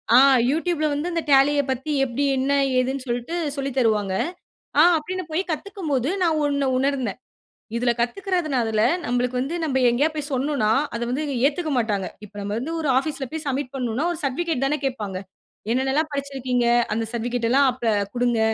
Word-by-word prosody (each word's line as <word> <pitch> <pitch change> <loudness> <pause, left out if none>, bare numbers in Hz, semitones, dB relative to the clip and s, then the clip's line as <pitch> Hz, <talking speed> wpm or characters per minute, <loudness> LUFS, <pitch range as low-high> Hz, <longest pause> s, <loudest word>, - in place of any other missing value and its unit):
ஆ! - - +9 0.3
YouTubeல 320 0 0
வந்து 300 +5 -2
இந்த 335 -2 -1
டேலிய 285 +1 +5
பத்தி 265 +4 -3
எப்படி? 255 +3 -2
என்ன? 270 +2 +1 0.2
ஏதுன்னு? 260 +1 0
சொல்ட்டு 240 +7 -3 0.2
சொல்லி 275 0 -2
தருவாங்க. 210 -5 +2 0.7
ஆ! - - +9 0.2
அப்படீன்னு 370 +4 -4
போய் 320 - +1
கத்துக்கும் 375 +1 -5
போது, 265 +1 +1
நான் 320 -3 +2
ஒண்ண 280 -1 0
உணர்ந்தேன். 260 -5 -1 0.6
இதில 240 0 +2
கத்துக்கிறதுனால, 260 - 0 0.2
நம்பளுக்கு 245 +1 0
வந்து 285 +7 -3
நம்ப 265 -3 0
எங்கேயாவது 295 +6 +1
போய் 295 0 -2
சொன்னோம்னா, 260 -5 +1 0.2
அத 235 - -3
வந்து 290 +4 -1 0.2
ஏத்துக்க 310 +1 -2
மாட்டாங்க. 205 -5 0 0.2
இப்ப 205 - -19
நம்ப 200 +1 -3
வந்து 315 +6 -4
ஒரு 295 - -1
ஆஃபீஸ்ல 275 -1 -2
போய் 315 -1 -5
சப்மிட் 275 0 -2
பண்ணணுனா, 255 +3 -1
ஒரு 325 - -5
சர்ட்டிபிகேட் 280 +1 -1
தான 300 +2 0
கேட்பாங்க. 210 -8 -3 0.5
"என்னென்னலாம் 270 +5 +1
படிச்சிருக்கீங்க? 260 -3 -1 0.3
அந்த 225 0 -1
சர்டிஃபிகேட்டல்லாம் 245 +3 +2
அப்ப 235 -4 0 0.2
குடுங்க." 240 -2 +1
270 Hz, 160 wpm, -23 LUFS, 245-300 Hz, 0.7 s, ஆ